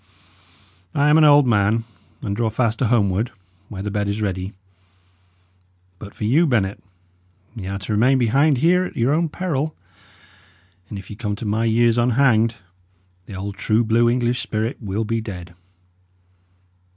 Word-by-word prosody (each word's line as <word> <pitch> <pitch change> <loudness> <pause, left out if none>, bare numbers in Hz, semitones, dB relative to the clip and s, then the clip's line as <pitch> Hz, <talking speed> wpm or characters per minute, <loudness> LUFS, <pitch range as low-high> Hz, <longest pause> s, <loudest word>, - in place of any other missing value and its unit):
I 145 +1 +3
am 155 - +6
an - - +5
old 145 -1 +6
man, 110 -1 +2 0.4
and 100 - -2
draw 115 +1 0
fast 115 0 -1
to 125 - +1
homeward, 105 -1 +1 0.4
where 95 -2 -6
the 105 - -3
bed 105 0 -1
is 100 +2 -2
ready. 95 -2 -3 1.5
But 100 -1 -11
for - - -7
you, 145 +11 +3
Bennet, 105 -7 0 0.7
y' 100 -5 -6
are 100 +1 -3
to 100 +2 -6
remain 125 +6 +3
behind 135 +4 +3
here 175 +6 +3
at - - -9
your 120 +4 +2
own 165 +1 +1
peril, 155 -3 -3 1.1
and 105 - -6
if 100 +1 -10
ye - - -7
come 105 -2 -3
to 110 - -7
my 110 +2 0
years 115 +1 +3
unhanged, 120 -2 +3 0.7
the 100 - -8
old 100 +1 -6
true 110 +2 +1
blue 115 +1 +3
English 120 0 0
spirit 110 +4 -3
will 105 +1 -2
be 115 +1 -1
dead." 90 -5 -8
115 Hz, 165 wpm, -21 LUFS, 105-125 Hz, 1.5 s, am